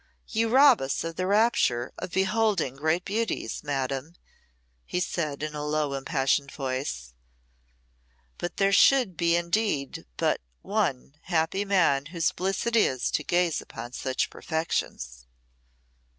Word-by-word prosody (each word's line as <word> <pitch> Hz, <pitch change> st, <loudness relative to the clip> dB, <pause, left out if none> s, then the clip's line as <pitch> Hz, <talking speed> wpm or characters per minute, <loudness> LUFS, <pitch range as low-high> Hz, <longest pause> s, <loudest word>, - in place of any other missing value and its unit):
"You 225 Hz, 0 st, +1 dB
rob 265 Hz, +1 st, +6 dB
us 135 Hz, 0 st, -2 dB
of 165 Hz, 0 st, -5 dB
the 185 Hz, +1 st, -2 dB
rapture 200 Hz, -, +2 dB
of 180 Hz, 0 st, -5 dB
beholding 190 Hz, -, +1 dB
great 160 Hz, +5 st, 0 dB
beauties, 220 Hz, +2 st, -2 dB
Madam," 140 Hz, +2 st, -3 dB, 0.7 s
he 180 Hz, -, -3 dB
said 155 Hz, -5 st, -2 dB
in 155 Hz, 0 st, -3 dB
a 150 Hz, 0 st, -4 dB
low, 150 Hz, -1 st, -1 dB
impassioned 135 Hz, 0 st, 0 dB
voice. 130 Hz, -, -4 dB, 1.3 s
"But 175 Hz, 0 st, -4 dB
there 195 Hz, 0 st, +3 dB
should 250 Hz, -5 st, +5 dB
be 170 Hz, +1 st, +2 dB
indeed 175 Hz, -4 st, -1 dB
but -, -, +1 dB, 0.2 s
one 65 Hz, +2 st, -1 dB
happy 170 Hz, +3 st, 0 dB
man 165 Hz, -8 st, +2 dB
whose 165 Hz, -1 st, 0 dB
bliss 190 Hz, +2 st, -2 dB
it 235 Hz, 0 st, 0 dB
is 130 Hz, -, +2 dB
to 150 Hz, -, 0 dB
gaze 175 Hz, 0 st, +1 dB
upon 120 Hz, -, -9 dB
such 130 Hz, 0 st, -2 dB
perfections." 60 Hz, -, -3 dB
165 Hz, 135 wpm, -27 LUFS, 135-195 Hz, 1.3 s, rob